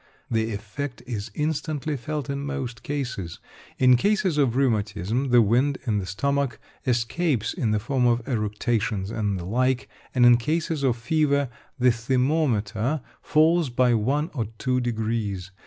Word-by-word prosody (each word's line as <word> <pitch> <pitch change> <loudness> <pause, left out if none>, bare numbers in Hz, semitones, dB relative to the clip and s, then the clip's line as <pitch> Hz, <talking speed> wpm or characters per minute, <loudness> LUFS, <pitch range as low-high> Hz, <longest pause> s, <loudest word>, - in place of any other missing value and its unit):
The 110 0 +1
effect 120 +5 -5
is 115 -3 -4
instantly 150 -1 -2
felt 145 +3 -4
in 140 0 -3
most 135 -5 -4
cases. 125 -12 -4 0.4
In 130 -1 +6
cases 195 - +1
of 130 -5 +2
rheumatism, 110 -1 0
the 120 -1 +6
wind 125 +7 +2
in 105 -4 +1
the 95 - -5
stomach 140 +5 -1 0.3
escapes 120 - 0
in 130 - -1
the 105 - +2
form 125 +3 +1
of 120 0 +1
eructations 105 -3 -1
and 105 -4 -1
the 85 - -6
like, 130 +5 +1 0.3
and 125 -1 +5
in 120 0 +8
cases 155 +4 -1
of 130 -3 +2
fever, 140 +2 +1 0.3
the 125 -1 +4
thermometre 125 0 0 0.2
falls 160 0 +3
by 125 0 +3
one 140 - 0
or 120 -6 -1
two 125 +1 0
degrees. 110 -5 -2
125 Hz, 150 wpm, -25 LUFS, 110-140 Hz, 0.4 s, in